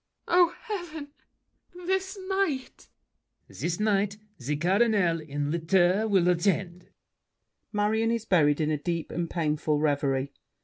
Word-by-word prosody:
Oh, 350 -1 +4
heaven! 350 -9 -6 0.8
this 380 +2 -1
night! 380 -10 -2 0.6
LAFFEMAS. - - -12
This 170 +1 -1
night 205 -1 +1 0.2
The 140 +4 -2
Cardinal, 185 +1 +2
in 145 -1 -3
litter, 180 +5 +2
will 190 -4 +3
attend. 180 0 0 0.8
[Marion 220 +2 +1
is 230 -1 -1
buried 150 -7 +3
in 155 -1 0
a 150 - -1
deep 170 0 -3
and 170 0 -3
painful 155 -2 0
reverie. 140 -2 0
180 Hz, 125 wpm, -27 LUFS, 155-225 Hz, 0.8 s, Oh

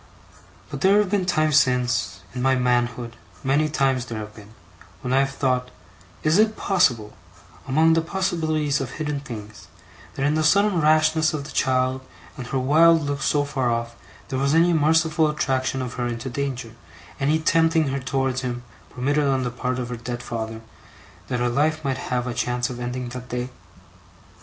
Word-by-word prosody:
But - - -6
there 195 +2 +5
have 205 -3 +2
been 195 -3 +1
times 155 -4 +3
since, 125 - +1
in 125 - -4
my 130 +1 +3
manhood, 120 -1 0 0.3
many 145 +3 +2
times 135 -4 +1
there 115 - -5
have 105 0 -7
been, 105 0 -15 0.5
when 125 - -2
I 135 - +4
have 135 0 +2
thought, 130 -2 -1 0.5
Is 155 +5 +3
it 215 0 +3
possible, 125 - +1 0.5
among 160 +4 +4
the 165 - +3
possibilities 160 -5 -1
of 130 - -5
hidden 150 -2 -3
things, 110 -6 -9 0.5
that 135 - -1
in 145 - +2
the 155 - +1
sudden 200 +1 +3
rashness 155 +1 +3
of 145 - -4
the 140 - -9
child 130 0 +1 0.3
and 125 - -7
her 135 - -2
wild 160 +5 +5
look 145 -1 -3
so 145 +1 +2
far 135 -3 -1
off, 115 0 -2 0.3
there 130 -2 -2
was 140 +3 +2
any 170 +1 +4
merciful 160 0 +3
attraction 130 -3 -1
of 125 -1 -5
her 120 - 0
into 120 +2 -4
danger, 125 -3 -3 0.5
any 145 +3 +2
tempting 160 -1 +2
her 140 +1 -2
towards 130 -1 -1
him 120 -1 -4 0.3
permitted 145 +4 0
on 135 -2 +1
the 125 - -2
part 125 +1 -3
of 125 -1 -4
her 120 - -4
dead 120 +1 -6
father, 110 -1 -5 0.7
that 125 - -2
her 120 - +1
life 155 +4 0
might 135 -1 0
have 125 -1 0
a 125 - -3
chance 125 +1 -1
of 120 - -7
ending 125 0 -4
that 125 +1 -8
day? 125 +1 -3
135 Hz, 185 wpm, -23 LUFS, 125-155 Hz, 0.7 s, there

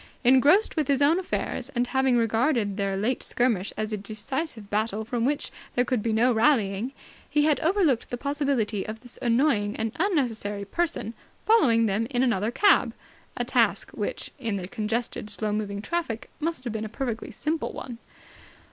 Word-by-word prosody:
Engrossed 280 - +5
with 310 -4 0
his 275 -2 +2
own 300 +5 +4
affairs, 275 -7 -3
and 240 +1 +2
having 265 -1 +2
regarded 225 -2 +1
their 195 -1 -1
late 230 +6 0
skirmish 230 -6 0
as 215 0 -2
a - - 0
decisive 220 +4 -4
battle 215 +1 -1
from 235 0 -1
which 285 +2 -1 0.2
there 245 - +3
would 250 -4 +2
be 225 - -1
no 240 +3 +3
rallying, 220 -2 +2 0.4
he 295 - +2
had 300 -1 +3
overlooked 325 - +2
the 245 - -3
possibility 275 -7 -1
of 220 +1 -7
this 245 -1 -11
annoying 235 -4 +2
and 225 0 -2
unnecessary 230 - 0
person 300 - -2 0.3
following 255 - +5
them 215 +2 0
in 250 -2 +1
another 225 -4 +1
cab 405 - +3 0.4
a - - -1
task - - +2
which, - - -4
in 225 -5 -2
the 185 -2 -4
congested, 225 0 -3
slow 210 0 -3
moving 205 -1 -3
traffic, 330 -9 -3
must 325 -4 -2
have 240 -3 -4
been 220 -1 -3
a 220 - -5
perfectly 235 -1 -4
simple 310 +1 -2
one. 240 -3 -8
235 Hz, 175 wpm, -26 LUFS, 215-280 Hz, 0.4 s, Engrossed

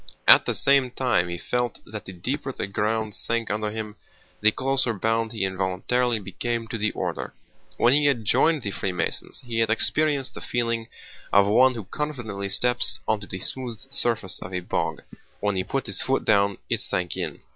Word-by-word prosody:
At - - +8
the - - 0
same 135 -2 +4
time 120 -9 0
he 85 - -4
felt 125 +5 -2
that 105 -1 -8
the - - -8
deeper 130 - -3
the - - -4
ground 105 +2 -1
sank 115 +1 -1
under 105 0 -1
him 105 0 -6 0.4
the 110 +1 +5
closer 130 -2 +1
bound 115 +2 0
he 110 -4 -1
involuntarily 95 +6 0
became 115 +4 -3
to 115 - -4
the 105 +1 +1
order. - - -4 0.4
When 120 - +4
he 145 +1 +4
had 120 -6 +1
joined 155 +6 +3
the 100 - -2
Freemasons 90 -3 -3
he 115 -2 -3
had 115 - +2
experienced 145 +4 +1
the - - -9
feeling 115 -1 -1 0.4
of 100 0 +6
one 125 +5 +4
who 115 - -5
confidently 110 -5 -4
steps 125 +4 +4
onto 105 -2 -1
the 95 - -4
smooth 125 -4 -2
surface 115 -8 +1
of 90 - -7
a 90 - -1
bog. - - -2 0.4
When 105 -1 0
he 95 - 0
put 135 +7 -3
his - - +1
foot 135 +1 0
down 100 -2 +3
it - - 0
sank 90 -2 -2
in. - - -4
115 Hz, 190 wpm, -25 LUFS, 100-125 Hz, 0.4 s, At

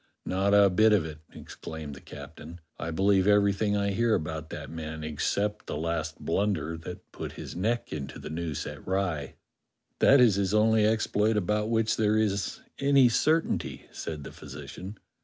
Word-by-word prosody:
"Not 100 +2 +2
a 100 -1 +6
bit 110 +4 +5
of 95 -6 +3
it," 75 -1 -7
exclaimed 80 -2 -8
the 70 - -11
captain; 85 +3 -10 0.2
"I 80 - -3
believe 95 +3 +3
everything 105 0 +3
I 100 0 0
hear 115 +2 +2
about 80 0 -4
that - - -7
man, 80 -1 -6
except 100 +7 -1
that - - -3
last 80 0 -2
blunder 100 -5 -1
that 90 +3 -9
put - - -6
his - - -8
neck 115 +7 -1
into 70 -3 -5
the - - -8
noose 80 -2 -3
at - - -8
Rye." 90 -7 -1 0.6
"That 140 - +6
is 115 -6 +5
his 100 +1 +1
only 110 0 +4
exploit 110 0 +1
about 105 +2 0
w^hich 115 -1 +2
there 110 0 +2
is 100 -2 0 0.2
any 140 -2 +5
certainty," 160 +7 0
said 75 -3 -6
the - - -8
physician. 75 +9 -9
100 Hz, 170 wpm, -28 LUFS, 80-105 Hz, 0.6 s, a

